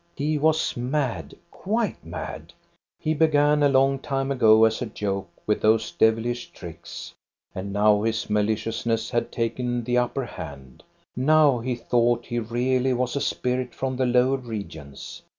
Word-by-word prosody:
He 150 +2 -1
was 160 +1 +2
mad, 125 - -2 0.2
quite 220 +3 -2
mad. - - -7 0.5
He 155 -1 0
began 150 -1 +3
a 145 - +5
long 135 0 +3
time 135 -1 -2
ago 110 -4 +5
as 110 +2 0
a 125 - -2
joke 100 -3 -3 0.2
with 105 - 0
those 110 0 +2
devilish 115 +2 +1
tricks, 85 -1 -10 0.4
and 95 +2 -5
now 105 +1 +3
his 110 0 -1
mali 105 +1 +1
ciousness 115 +1 -2
had 120 -1 -1
taken 120 +1 -2
the 125 +1 +1
upper 125 +2 -1
hand; 70 - -10 0.3
now 145 0 +4
he 125 +1 -2
thought 120 0 +1
he 120 - -2
really 125 +3 0
was 125 +1 -1
a 140 - -1
spirit 125 0 -2
from 130 -1 -2
the 130 0 +1
lower 125 +2 +3
regions. 100 - -8
120 Hz, 155 wpm, -24 LUFS, 110-135 Hz, 0.5 s, a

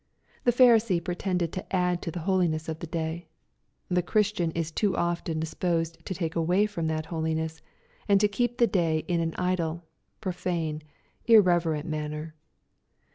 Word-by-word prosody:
The 240 - +6
Pharisee 230 -6 +5
pretended 180 -1 -2
to 185 +1 -4
add 180 -1 +1
to - - -4
the 170 +1 -5
holiness 170 -3 +1
of 160 -1 -4
the 170 - -6
day. 160 +1 -3 0.6
The 180 0 +2
Christian 205 -2 +1
is 165 -1 -2
too 200 +3 0
often 170 -2 -1
disposed 165 +1 -2
to 185 - -3
take 165 -3 -3
away 175 +5 +3
from 175 -6 -3
that 155 -1 -2
holiness^ 160 -1 -2 0.5
and 200 -2 +5
to 210 - +4
keep 240 +4 -1
the 240 - +5
day 165 -6 +1
in 175 -1 +1
an 165 -1 -1
idle, 175 -2 -1 0.4
profane, 175 -5 -2 0.5
irreverent 175 -8 +4
manner. 155 0 -4
170 Hz, 155 wpm, -27 LUFS, 160-185 Hz, 0.6 s, The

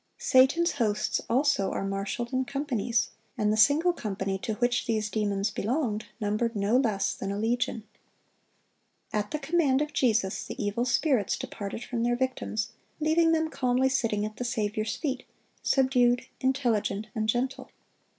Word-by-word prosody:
Satan's 280 +7 +4
hosts 215 -6 0
also 255 -6 +2
are - - -2
marshaled 200 +6 -3
in 260 0 +2
companies, 245 -4 -1 0.3
and 210 -2 +2
the - - +2
single 290 +11 +4
company 195 - -3
to 220 0 -3
which 245 +1 0
these 215 -2 0
demons 205 -1 0
belonged 215 -1 -1
numbered 215 +2 -1
no 205 +3 +1
less 225 -7 +2
than 195 - -4
a 200 - -3
legion. 225 0 -1 1.3
At 210 -1 -1
the 305 - -2
command 295 -2 +2
of 300 0 -2
Jesus, 220 -7 +1
the - - -8
evil 210 +4 0
spirits 245 - +1
departed 240 -5 -6
from 235 -2 -3
their 240 +1 +2
victims, 240 -3 -2 0.3
leaving 325 +2 +3
them 320 -1 +1
calmly 255 0 +2
sitting 225 -5 0
at 215 0 -7
the - - -3
Saviour's 215 -2 -1
feet, 270 -5 -3 0.4
subdued, 250 -2 +3
intelligent, 235 -6 0
and 220 -2 -1
gentle. 255 +4 -1
240 Hz, 150 wpm, -28 LUFS, 210-265 Hz, 1.3 s, Satan's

